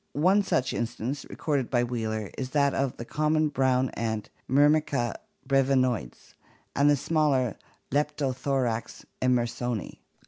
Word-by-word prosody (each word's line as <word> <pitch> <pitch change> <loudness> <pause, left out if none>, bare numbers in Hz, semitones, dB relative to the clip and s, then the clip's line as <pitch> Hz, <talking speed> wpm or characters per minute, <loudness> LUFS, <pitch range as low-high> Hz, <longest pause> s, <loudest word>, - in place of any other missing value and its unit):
One 185 +7 +4
such 130 -10 0
instance, 120 +4 -3
recorded 140 -6 -1
by 120 -2 +2
Wheeler, 110 -4 -3
is 130 -1 -4
that 140 0 +2
of 135 -2 -1
the 120 - -6
common 155 +3 +1
red 150 - -1
brown 130 -1 +2
ant 110 -2 -3 0.2
Myrmica 145 -3 +3 0.3
brcvinoides 130 - +1 0.4
and 140 +1 +4
the 145 - +5
smaller 140 -6 +1 0.4
Leptolhorax 135 -4 -1 0.2
enter 125 -2 +3
soni. 120 -2 -4
130 Hz, 130 wpm, -27 LUFS, 120-145 Hz, 0.4 s, the